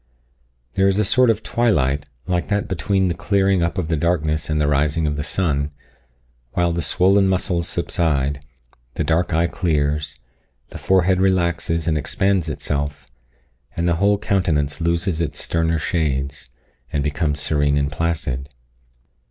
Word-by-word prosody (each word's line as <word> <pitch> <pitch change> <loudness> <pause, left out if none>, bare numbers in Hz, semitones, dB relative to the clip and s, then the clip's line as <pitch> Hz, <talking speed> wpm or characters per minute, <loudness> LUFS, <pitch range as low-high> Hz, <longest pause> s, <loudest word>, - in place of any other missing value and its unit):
There 95 0 +3
is 95 0 +2
a 105 - +2
sort 120 +4 +4
of 115 - +1
twilight, 75 - +1 0.2
like 90 -1 -1
that 100 -1 -1
between 95 +1 0
the 85 - 0
clearing 95 0 +1
up 85 +4 -1
of 90 -4 -1
the 80 - 0
darkness 80 -1 0
and 75 0 0
the 75 - +2
rising 75 +3 +1
of 75 -1 -1
the 75 - -3
sun, 75 -3 -1 0.8
while 85 -1 +1
the 85 0 -1
swollen 95 +5 +3
muscles 90 -2 0
subside, 70 -4 -1 0.5
the - - -1
dark 85 +2 +1
eye 80 +2 +2
clears, 75 -4 -1 0.5
the - - -9
forehead 95 0 +2
relaxes 85 -3 +1
and 80 -2 +1
expands 95 +2 0
itself, 75 -1 -3 0.7
and 85 +1 0
the 85 -1 +2
whole 100 +3 +3
countenance 85 -7 0
loses 85 +1 0
its 75 -4 -2
sterner 80 0 0
shades, 75 -4 -2 0.4
and 70 - -1
becomes 75 0 -1
serene 75 -1 +1
and 70 0 0
placid. 75 -5 -2
85 Hz, 150 wpm, -21 LUFS, 75-95 Hz, 0.8 s, sort